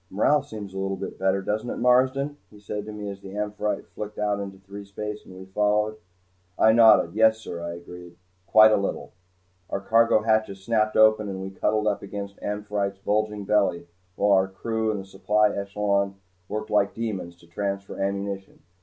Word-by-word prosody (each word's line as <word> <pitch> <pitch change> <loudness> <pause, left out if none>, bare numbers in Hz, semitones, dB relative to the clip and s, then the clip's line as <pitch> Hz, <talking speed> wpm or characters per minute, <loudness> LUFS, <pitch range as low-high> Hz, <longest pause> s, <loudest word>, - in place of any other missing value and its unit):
"Morale 140 +9 +3
seems 105 -8 -8
a 95 - -4
little 95 0 -2
better, 95 0 -1
doesn't 110 +4 -2
it, - - -4
Marsden?" 130 +4 +2
he 105 - -16
said 105 0 -5
to 110 - -7
me 105 -1 -6
as 100 -1 -7
the 95 +1 -9
"Amphitrite" 105 0 -2
flicked 105 0 -7
out 105 -1 0
into 100 -1 -6
threespace 100 +2 -7
and 95 - -13
we 95 - -9
followed. 105 +2 +1 0.6
I 110 - +6
nodded. 115 -1 +6
"Yes, 110 +1 +4
sir," 85 -6 -7
I 85 0 -4
agreed. 85 0 -11 0.3
"Quite 110 +2 +7
a - - +4
little." 100 - -3 0.6
Our - - -2
cargo 115 +1 +3
hatches 110 -3 0
snapped 110 0 +1
open 110 -1 +5
and 95 -1 -5
we 95 0 -6
cuddled 105 +2 0
up 105 -1 0
against 100 0 -7
"Amphitrite's" 105 -1 -2
bulging 105 +1 -1
belly 95 -5 +1 0.3
while 100 0 +2
our 95 -1 +4
crew 110 +3 -2
and 105 -2 -1
the 95 - -8
supply 105 +2 +1
echelon 100 0 0 0.3
worked 110 +1 -4
like 100 -1 +2
demons 100 -7 -4
to 85 - -20
transfer 100 +3 -4
ammunition. 100 0 -4
105 Hz, 180 wpm, -25 LUFS, 95-110 Hz, 0.6 s, Quite